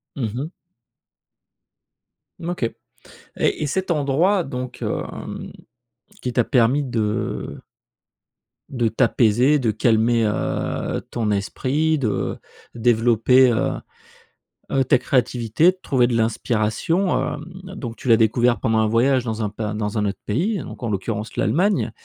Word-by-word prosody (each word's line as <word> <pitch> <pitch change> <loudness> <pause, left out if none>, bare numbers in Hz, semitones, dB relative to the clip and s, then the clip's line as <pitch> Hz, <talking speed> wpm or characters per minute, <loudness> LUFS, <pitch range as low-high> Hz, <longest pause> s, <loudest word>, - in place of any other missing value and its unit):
Mmh 130 - -2
mh. 145 +6 -4 1.9
Mmh, 170 - -5
OK. 175 - -3 0.7
Et - - 0
et - - +1
cet 190 +6 -2
endroit, 165 +5 +2
donc, 125 -1 -6
hem, - - -5 0.7
qui 125 - -3
t'a 120 -1 +2
permis 125 +3 +3
de 115 -3 -3 1.1
de 120 -4 0
t'apaiser, 120 +5 +3
de 115 -5 +1
calmer, 115 +1 +2
heu, 105 - -2
ton 115 -3 -1
esprit, 140 +10 0
de 110 -6 -1 0.4
développer 120 +2 +4
heu, 115 - +1 1.0
heu, 135 - +3
ta 130 - +4
créativité 125 +4 +2
de 185 - -18
trouver 125 -3 +2
de 120 - -1
l'inspiration, 115 - 0 0.2
hem, 150 - -7 0.3
donc 120 -10 -6
tu - - -9
l'as 115 - +7
découvert 120 +1 +2
pendant 110 0 +1
un 110 - +2
voyage 125 +3 +2
dans 110 -1 -2
un 105 - -1
pas 105 0 -4
dans 105 0 -3
un 105 - +1
autre 100 -1 -3
pays, 185 - 0
hein, - - -6
donc - - -10
en 115 - -1
l'occurrence 105 +2 -3
l'Allemagne. 175 - +1
120 Hz, 140 wpm, -22 LUFS, 110-140 Hz, 1.9 s, l'as